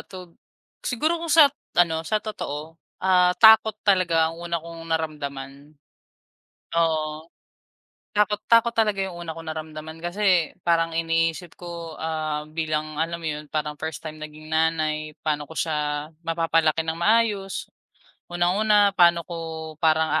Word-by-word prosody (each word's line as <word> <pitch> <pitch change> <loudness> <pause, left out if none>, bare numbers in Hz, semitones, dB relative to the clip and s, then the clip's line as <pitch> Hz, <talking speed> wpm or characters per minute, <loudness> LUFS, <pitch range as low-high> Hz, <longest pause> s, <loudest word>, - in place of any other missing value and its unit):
tog 185 -3 -11 0.5
siguro 310 +7 -1
kung 335 - -5
sat 300 -3 +7 0.2
ano 165 -2 +3
sa 215 -1 0
totoo, 160 -7 -5 0.3
ah, 180 -1 +4
takot 220 0 +7
talaga 170 -5 +3
ang 165 - -11
una 170 0 -2
kong 165 0 -9
naramdaman. 145 -2 -4 1.0
Oo. 160 -1 0 0.8
Takot 210 0 +1
takot 230 0 +5
talaga 215 -3 +1
'yong 190 - -7
una 165 -1 -6
kong 165 -1 -7
naramdaman, 155 0 -8
kasi 180 -1 +2 0.2
parang 165 -1 +2
iniisip 165 +1 0
ko, 170 -2 -8
ah, 155 -1 -2
bilang 155 -1 -3
alam 170 +2 -2
mo - - -7
'yon, 150 - -9
parang 150 -1 -2
first 160 -1 -5
time 155 -1 -8
naging 155 0 -10
nanay, 155 -1 0
paano 150 -2 -1
ko 160 - -12
siya 150 -2 -2 0.2
mapapalaki 165 -1 +1
ng 160 0 -2
maayos, 205 0 +1 0.6
unang-una 200 +3 +3
paano 170 -2 +4
ko 175 - -7 0.5
parang 160 0 +4
165 Hz, 135 wpm, -24 LUFS, 155-185 Hz, 1.0 s, sat